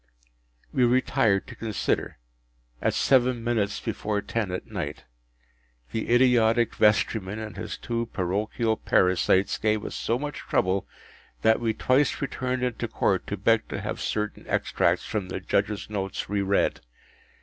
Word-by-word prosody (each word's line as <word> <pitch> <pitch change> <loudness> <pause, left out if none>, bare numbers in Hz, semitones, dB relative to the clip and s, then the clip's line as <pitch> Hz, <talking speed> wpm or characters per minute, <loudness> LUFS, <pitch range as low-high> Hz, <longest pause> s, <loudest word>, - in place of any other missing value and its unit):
We 130 - +3
retired 120 -4 +2
to - - -10
consider, 110 -3 -2 0.6
at - - +1
seven 125 -3 +3
minutes 110 -4 0
before 105 -1 -2
ten 110 -1 -2
at 90 0 -4
night. 75 +1 -5 0.9
The 110 - -3
idiotic 120 -2 +4
vestryman 105 -1 +2
and 110 -4 -6
his - - -5
two 115 0 -3
parochial 110 +4 -1
parasites 95 +1 +2
gave 110 -1 +1
us - - -5
so 115 - -1
much 145 +2 -5
trouble 95 +1 0 0.6
that 110 0 +4
we 115 -2 0
twice 130 +4 +2
returned 130 -2 -2
into 125 -2 -1
Court - - 0
to - - -3
beg - - +2
to - - -4
have - - -4
certain 105 -1 -2
extracts - - +1
from 100 -4 -3
the 95 - -3
Judge’s 100 +2 -1
notes 95 -2 -3
re 100 0 0
read. 100 0 +1
110 Hz, 145 wpm, -26 LUFS, 100-120 Hz, 0.9 s, idiotic